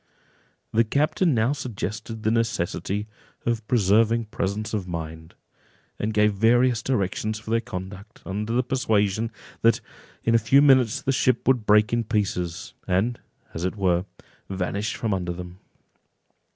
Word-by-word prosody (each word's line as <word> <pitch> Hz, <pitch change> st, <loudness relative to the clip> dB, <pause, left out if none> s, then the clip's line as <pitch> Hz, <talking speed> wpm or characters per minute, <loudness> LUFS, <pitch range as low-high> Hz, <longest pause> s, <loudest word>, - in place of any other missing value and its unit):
The 115 Hz, -, +5 dB
captain 150 Hz, -, +1 dB
now 115 Hz, +5 st, +2 dB
suggested 110 Hz, -3 st, -5 dB
the 110 Hz, -, +2 dB
necessity 105 Hz, -3 st, -1 dB, 0.4 s
of 115 Hz, -2 st, -1 dB
preserving 115 Hz, +1 st, +3 dB
presence 105 Hz, +3 st, -2 dB
of 100 Hz, -4 st, -2 dB
mind, 80 Hz, -1 st, -6 dB, 0.6 s
and 105 Hz, -, -1 dB
gave 105 Hz, 0 st, +3 dB
various 120 Hz, +3 st, +3 dB
directions 110 Hz, -2 st, -1 dB
for 110 Hz, +1 st, -8 dB
their 115 Hz, 0 st, +2 dB
conduct, 100 Hz, +1 st, -8 dB
under 105 Hz, +3 st, -3 dB
the 125 Hz, +2 st, +2 dB
persuasion, 110 Hz, -4 st, 0 dB, 0.3 s
that 115 Hz, 0 st, +4 dB, 0.4 s
in 115 Hz, -, +2 dB
a 115 Hz, -, +6 dB
few 125 Hz, +6 st, +4 dB
minutes 130 Hz, -5 st, +4 dB
the 135 Hz, -, +1 dB
ship 130 Hz, -2 st, +1 dB
would 125 Hz, -5 st, +2 dB
break 105 Hz, +2 st, +5 dB
in 120 Hz, 0 st, +2 dB
pieces, 95 Hz, -6 st, -2 dB
and, 100 Hz, +6 st, +1 dB, 0.3 s
as 80 Hz, -, -4 dB
it 95 Hz, -, -1 dB
were, 90 Hz, -3 st, +1 dB, 0.4 s
vanish 100 Hz, +3 st, -2 dB
from 110 Hz, -3 st, -1 dB
under 90 Hz, -2 st, -2 dB
them. 90 Hz, +1 st, -9 dB
110 Hz, 145 wpm, -25 LUFS, 95-115 Hz, 0.6 s, a